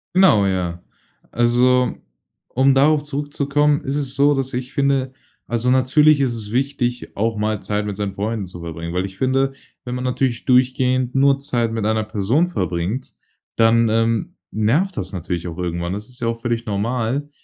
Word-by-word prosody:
Genau, 110 - +5
ja. 90 -2 -2 0.5
Also, 125 +2 +3 0.5
um 135 +2 +3
darauf 145 +2 +4
zurückzukommen, 145 0 0
ist 140 0 -2
es 140 -3 -3
so, 145 +1 +4
dass 135 -1 -2
ich 125 +1 -4
finde, 135 -2 +1 0.3
also 120 +1 -1
natürlich 140 +4 +4
ist 130 -3 +1
es 105 -3 -6
wichtig, 125 -1 -2
auch 110 +1 -1
mal 105 -1 -1
Zeit 105 0 -2
mit 100 -2 -4
seinen 100 -1 -3
Freunden 105 0 -2
zu 90 -1 -10
verbringen, 85 0 -6
weil 90 +2 0
ich 95 -1 -9
finde, 135 +1 +1 0.3
wenn 125 - -4
man 125 - -4
natürlich 125 -1 -1
durchgehend 130 0 +2
nur 140 0 +4
Zeit 120 -5 -1
mit 110 -2 -2
einer 110 0 +1
Person 110 - +1
verbringt, 100 - -3 0.4
dann, 115 0 +4
ähm, 115 0 0 0.2
nervt 150 - +1
das 95 +1 -4
natürlich 90 -1 -4
auch 85 +1 -7
irgendwann. 85 0 -2
Das 105 +4 -6
ist 125 - -9
ja 115 - 0
auch 115 0 -3
völlig 120 -1 -2
normal, 115 +6 -1
120 Hz, 175 wpm, -20 LUFS, 105-135 Hz, 0.5 s, Genau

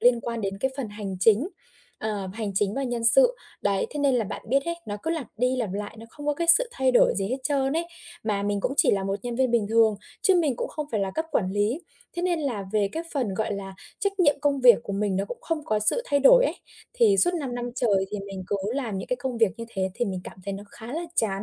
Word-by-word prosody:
liên 240 -1 +4
quan 235 0 -4
đến 195 -1 -3
cái 265 +6 0
phần 265 -5 -3
hành 205 -2 -6
chính, 225 - +4 0.5
ờ, 205 -3 -3
hành 215 -2 -4
chính 200 +1 +1
và 275 - -1
nhân 240 -3 -2
sự. - - +5 0.3
Đấy, 200 -1 +1
thế 295 - -5
nên 280 -2 +3
là 235 - +1
bạn - - -6
biết 275 +3 +2
ấy, 340 - -2
nó 205 0 -3
cứ 325 - -1
lặp 320 -7 -2
đi 250 +3 +1
lặp 225 -7 -2
lại, 205 +2 -5
nó 225 - -10
không 290 +3 -10
có 295 - +2
cái 335 +3 -2
sự - - -2
thay 265 -1 +2
đổi 245 - +5
gì 195 0 -1
hết 255 - -1
trơn 275 -1 +1
ấy. 330 +2 -1 0.4
Mà 205 -2 0
mình 205 0 -1
cũng 245 - -1
chỉ - - +5
là 195 -1 0
một 195 0 -1
nhân 240 -1 -4
viên 260 -1 +2
bình 230 -3 +2
thường, 225 -1 +4 0.3
chứ 385 - +5
mình 310 -8 +2
cũng - - -3
không 300 -1 -5
phải 215 - 0
là 195 -1 -1
cấp 320 - -1
quản 185 -10 +1
lý, 205 - 0 0.4
thế 345 - -2
nên 350 -3 +1
là 240 -9 -2
về 205 -2 +2
cái 325 - -3
phần, 245 -9 -1
gọi 220 +1 -1
là, 195 -1 -6 0.3
trách 395 -1 -1
nhiệm 290 -5 +4
công 285 -2 +1
việc 250 -2 +8
của 200 - -5
mình 200 -1 0
nó 195 - 0
cũng 240 +4 -7
không 320 -3 -3
có 215 -5 +1
sự 215 - +1
thay 285 -1 +1
đổi - - +7
ấy. - - 0 0.4
Thì 455 -5 +4
suốt 355 -2 +3
5 275 -7 -3
năm 245 0 -4
trời 200 -6 +2
thì 210 - -3
mình 195 -1 -6
cứ 205 - 0 0.2
làm 235 -8 -2
những 190 - -6
cái 250 - 0
công 250 -1 -4
việc 225 -3 +4
như 230 - -4
thế 190 -4 -2
thì 240 +2 0
mình 190 -3 -3
cảm - - -10
thấy 200 - -3
nó 200 +1 -7
khá 230 +2 -9
là 325 +3 -2
chán, 195 -3 0
235 Hz, 285 wpm, -26 LUFS, 205-285 Hz, 0.5 s, việc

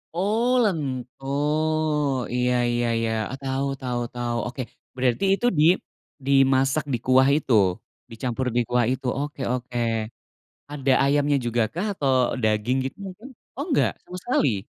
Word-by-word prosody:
Oh 215 +6 +1 0.2
lento. 135 - -3 1.1
Iya 125 0 +1 0.2
iya 120 0 0
iya, 115 -1 0 0.3
tahu 135 +1 -1
tahu 125 -1 -2
tahu. 120 -1 -2
Oke, 125 +2 -5 0.4
berarti 125 +7 +1
itu 220 +5 -1
di - - +5 0.6
dimasak 135 +1 +3
di - - +2
kuah 130 +1 +5
itu, 135 -5 -1 0.6
dicampur 125 +3 -3
di 120 - +4
kuah 125 -1 +2
itu? 130 +1 -4
Oke 145 -1 -5
oke. 125 -1 -4 0.9
Ada 140 -2 0
ayamnya 145 0 +2
jugakah 120 - -1
atau 140 -7 0 0.3
daging 110 +4 +1
gitu 135 - -5
mungkin? 200 +7 -10 0.3
Oh, 280 - -2
enggak, 285 - +2
sama 180 - -8
sekali? 130 - +1
130 Hz, 135 wpm, -24 LUFS, 120-145 Hz, 1.1 s, di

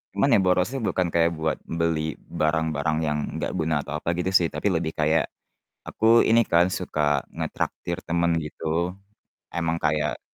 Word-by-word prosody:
Cuman, - - +2
ya, - - +6
borosnya 90 +8 +1
bukan 95 -6 0
kayak 85 0 +3
buat 80 0 -1
beli 80 -2 -1 0.2
barang-barang 80 -1 +1
yang 75 -1 0 0.2
enggak - - -2
guna 80 -2 0
atau 75 +2 -4
apa 85 - -3
gitu, 95 +2 -1
sih, 90 -3 +4
tapi 100 +4 -1
lebih 80 -2 -1
kayak, 80 -1 +2 0.6
aku 115 +2 +4
ini 115 +1 +4
kan 85 +2 +3
suka 75 -5 0
ngetraktir 85 +1 -3
temen 85 0 +1
gitu, 80 +3 -2 0.6
emang 85 -1 0
kayak, 75 -3 0
80 Hz, 155 wpm, -25 LUFS, 75-85 Hz, 0.6 s, ya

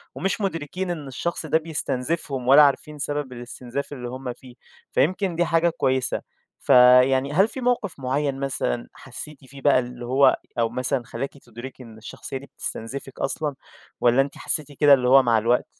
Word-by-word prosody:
ومش 195 +3 -2
مدركين 180 0 -3
إن 155 -5 -5
الشخص 160 +6 -4
ده 160 +1 +3
بيستنزفهم 150 -3 -3
ولا 140 +3 +8
عارفين 150 +1 +1
سبب 145 -2 -3
الاستنزاف 125 +3 -6
اللي 125 -3 -6
هُم 130 -1 -5
فيه، 125 0 -16 0.4
فيمكن 185 +2 +1
دي 175 +1 +2
حاجة 165 +1 +2
كويسة. 130 -6 0 0.4
فيعني 130 +1 +5
هل 190 +6 +4
في 260 - -7
موقف 240 - -1
معيّن 135 +1 -1
مثلًا 60 - -2
حسيتِ 150 -3 -10
فيه 135 +2 -13
بقى 140 -2 +4
اللي 125 -1 -6
هو 135 +3 +4 0.2
أو 115 - +2
مثلًا 125 +1 -2
خلاكِ 135 +4 -6
تدركي 125 +1 -11
إن 115 -2 -13
الشخصية 115 +4 -7
دي 140 - -10
بتستنزفِك 135 +1 -7
أصلًا، 145 +1 -2 0.5
والّا 120 +2 +5
أنتِ 140 +1 -4
حسيتِ 150 -2 -2
كده 145 0 +5
اللي 125 -2 +3
هو 135 0 +7
مع 115 -2 +3
الوقت؟ 120 +3 +2
135 Hz, 170 wpm, -24 LUFS, 125-150 Hz, 0.5 s, ولا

